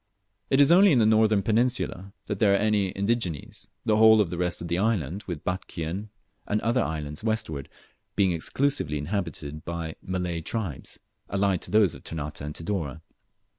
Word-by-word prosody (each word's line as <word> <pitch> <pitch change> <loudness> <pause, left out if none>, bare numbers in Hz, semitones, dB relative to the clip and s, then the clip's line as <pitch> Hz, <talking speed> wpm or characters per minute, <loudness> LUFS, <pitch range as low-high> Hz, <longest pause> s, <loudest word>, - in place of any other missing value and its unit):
It 135 - +3
is 145 +2 +6
only 190 +3 +7
in 135 - +4
the 115 - +4
northern 110 -2 +4
peninsula 110 -4 0
that 105 -2 -4
there 100 -3 +4
are - - +4
any 105 -2 +1
indígenes, 100 - -2 0.2
the 105 -1 +3
whole 110 0 +7
of 95 -6 +1
the 90 - -3
rest 90 -1 -1
of 85 - -5
the 85 +1 0
island, 100 -5 0
with 85 -5 -5
Batchian 90 +2 -4 0.4
and 105 - +1
the - - -8
other 120 +2 +2
islands 75 -2 -4
westward, 110 - -2 0.5
being 95 -3 +3
exclusively 85 - 0
inhabited 75 -2 -4
by 85 -1 -4
Malay 90 -2 -3
tribes, 95 - -4 0.3
allied 100 -2 +1
to - - -5
those 105 -2 +4
of - - -12
Ternate 75 -2 -5
and 75 +1 -5
Tidore. 80 -4 -3
95 Hz, 175 wpm, -26 LUFS, 80-110 Hz, 0.5 s, only